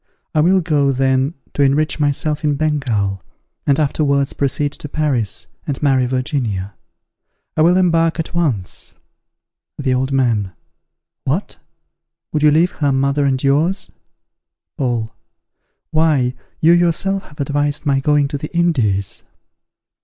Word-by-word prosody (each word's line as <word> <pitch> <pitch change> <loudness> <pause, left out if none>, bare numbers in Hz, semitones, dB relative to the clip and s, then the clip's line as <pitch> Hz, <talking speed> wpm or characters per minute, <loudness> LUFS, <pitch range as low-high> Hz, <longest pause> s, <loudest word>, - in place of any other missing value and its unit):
I 155 - +2
will 185 +4 +4
go, 145 -4 +2
then, 135 +3 +1 0.2
to - - -1
enrich 145 +3 +2
myself 150 +1 0
in 150 -1 +2
Bengal, 125 - -1 0.5
and 140 0 +3
afterwards 140 -2 +1
proceed 140 +1 0
to 150 - -7
Paris, 140 -9 -1 0.2
and 140 - -2
marry 130 -3 +3
Virginia. 120 - -2 0.8
I - - +2
will 175 +3 +5
embark 165 -2 +2
at 165 - -3
once. 135 - -2 0.8
The 135 -3 0
Old 130 +2 0
Man. 115 -8 +1 0.7
What! 155 +10 -2 0.8
would 150 - +1
you 150 - +6
leave 165 +4 +3
her 145 -2 +1
mother 140 +2 +1
and 130 -1 0
yours? 165 +7 +1 0.8
Paul. 120 -4 -2 0.8
Why, 150 -6 +2 0.3
you 160 - +6
yourself 175 +3 +2
have 150 - -18
advised 145 +1 -1
my 140 -2 +2
going 145 +1 +2
to 145 -1 -4
the 150 - -6
Indies. 115 - +1
145 Hz, 130 wpm, -18 LUFS, 130-155 Hz, 0.8 s, you